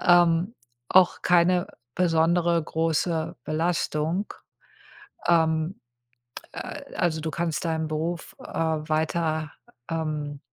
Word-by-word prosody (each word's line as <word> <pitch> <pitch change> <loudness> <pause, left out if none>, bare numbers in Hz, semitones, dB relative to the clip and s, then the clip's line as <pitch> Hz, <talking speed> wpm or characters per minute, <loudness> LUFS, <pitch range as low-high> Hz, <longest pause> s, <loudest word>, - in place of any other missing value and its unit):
ähm, 175 +4 +4 0.3
auch 185 -1 +5
keine 180 0 +3 0.3
besondere, 170 0 +3
große 165 +1 -1
Belastung. 165 +2 -1 0.9
Ähm, 160 +1 +2 0.7
äh, - - -7
also 160 -2 +1
du 160 0 -3
kannst 165 -2 -2
deinen 160 -1 -1
Beruf, 165 +2 -3
äh, - - -12
weiter, 155 0 -1 0.4
ähm, 150 -3 -3
165 Hz, 90 wpm, -26 LUFS, 155-175 Hz, 0.9 s, auch